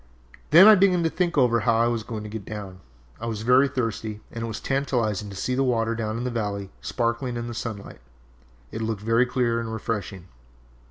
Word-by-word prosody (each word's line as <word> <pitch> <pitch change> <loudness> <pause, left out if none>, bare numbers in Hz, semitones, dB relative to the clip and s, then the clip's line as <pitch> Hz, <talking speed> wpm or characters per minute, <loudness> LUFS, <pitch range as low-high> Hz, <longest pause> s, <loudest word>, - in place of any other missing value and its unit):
"Then 170 +6 +9
I 215 - +10
began 185 -3 +4
to 165 - +1
think 175 -3 -1
over 120 -3 +4
how 115 +1 +2
I 115 +1 +3
was 120 -1 0
going 110 -1 -6
to 105 - -7
get 110 -1 -6
down. 100 -3 -8 0.4
I 115 - -5
was 110 -2 -4
very 125 +4 +5
thirsty 115 -5 -3
and 115 - -5
it - - -2
was 110 - -5
tantalizing 120 -7 -1
to 100 - -9
see 125 +6 -2
the 130 - +1
water 115 -3 +1
down 110 -1 -3
in 120 - -3
the 125 - -2
valley 100 -4 -3
sparkling 120 +1 -2
in 120 - -4
the 120 - -5
sunlight. 110 - -7 0.7
It 110 - -5
looked 110 -2 -2
very 115 +3 +3
clear 120 -2 0
and 115 -1 -4
refreshing. 100 -5 -4
115 Hz, 215 wpm, -25 LUFS, 110-125 Hz, 0.7 s, I